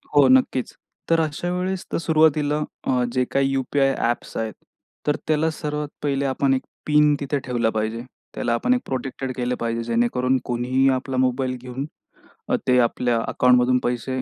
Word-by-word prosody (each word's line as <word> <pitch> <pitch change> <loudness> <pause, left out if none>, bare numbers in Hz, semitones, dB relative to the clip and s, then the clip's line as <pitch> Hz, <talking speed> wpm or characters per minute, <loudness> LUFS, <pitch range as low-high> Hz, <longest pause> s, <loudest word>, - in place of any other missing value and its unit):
हो 145 -2 +7
नक्कीच. 130 0 +3 0.4
तर 165 - +4
अशा 155 +3 -2
वेळेस 185 +1 -2
तर - - 0
सुरुवातीला 155 -3 +2 0.3
अ, 125 -1 +2
जे 130 -1 +2
काही 135 0 +2
यू-पी-आय 135 +1 +1
ॲप्स 120 +1 -2
आहेत, 110 -1 -2 0.5
तर 150 - +3
त्याला 155 +1 +2
सर्वात 150 -1 -4 0.2
पहिले 140 -1 0
आपण 135 0 +1
एक 130 - 0 0.2
पिन 150 0 +4
तिथे 140 0 -1
ठेवला 120 -3 0
पाहिजे. 110 +1 -2 0.3
त्याला 120 - 0
आपण 250 - +2
एक 250 - 0
प्रोटेक्टेड 130 0 -4
केलं 125 0 -1
पाहिजे, 115 0 -2
जेणेकरून 120 +3 +1
कोणीही 125 +2 +1
आपला 130 0 -1
मोबाईल 130 0 +1
घेऊन 130 +2 -5 0.6
अ, - - +3
ते 125 - +4
आपल्या 120 0 +1
अकाउंटमधून 125 0 +4
पैसे 125 +2 -2
130 Hz, 165 wpm, -23 LUFS, 125-145 Hz, 0.6 s, हो